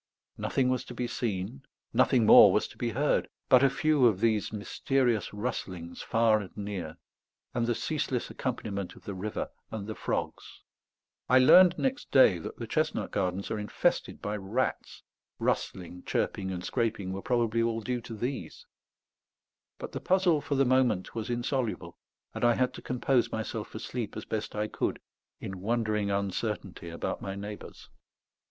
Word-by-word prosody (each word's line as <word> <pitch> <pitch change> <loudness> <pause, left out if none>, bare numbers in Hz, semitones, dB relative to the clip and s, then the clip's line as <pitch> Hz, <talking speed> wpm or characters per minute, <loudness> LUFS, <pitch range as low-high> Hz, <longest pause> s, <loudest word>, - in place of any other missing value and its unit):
Nothing 130 -2 0
was 130 -1 0
to - - -9
be 125 - -2
seen, 115 +1 -3 0.3
nothing 125 -5 +4
more 105 -2 +9
was 105 - +1
to - - -14
be 120 - -2
heard, 140 +6 +1 0.2
but 130 - +7
a 140 - +5
few 140 -1 +3
of 105 -5 +1
these 110 -2 +1
mysterious 120 +2 0
rustlings 95 -6 -5
far 115 -1 +3
and 95 -4 -9
near, 100 -6 -5 0.6
and 115 -1 0
the 120 - +1
ceaseless 140 -5 -2
accompaniment 100 -7 -4
of - - -16
the 100 - -5
river 100 +3 -4 0.2
and 105 -3 -5
the 110 - -4
frogs. - - -4 0.7
I 130 - +6
learned 175 +7 +7
next 265 +2 -1
day 105 -10 +6
that - - -7
the - - -5
chestnut - - -1
gardens 95 0 -1
are 110 - -1
infested 105 - -1
by 105 +1 -2
rats; 105 +7 -2 0.3
rustling, 90 0 -2
chirping, 95 -1 -1
and 90 -2 -4
scraping 105 -5 -1
were 95 - -4
probably 115 -1 +1
all 115 -1 0
due 120 +2 -2
to 115 0 -8
these; 125 +5 -5 1.1
but - - -7
the - - -5
puzzle, 180 -5 +3
for 145 -2 -2
the 135 0 +3
moment, 125 -7 +2
was 110 -1 -4
insoluble, 120 -7 -2 0.4
and - - -5
I 120 -1 +5
had 125 -1 +1
to - - -9
compose 125 0 +1
myself 110 -1 -3
for - - -9
sleep 115 -1 -5
as 110 - -6
best 110 -1 -4
I 105 0 -1
could, - - -2 0.4
in 95 -1 -6
wondering 110 -1 0
uncertainty 100 -2 -3
about 85 - -4
my 95 - -4
neighbours. 105 +1 -8
110 Hz, 165 wpm, -29 LUFS, 100-125 Hz, 1.1 s, more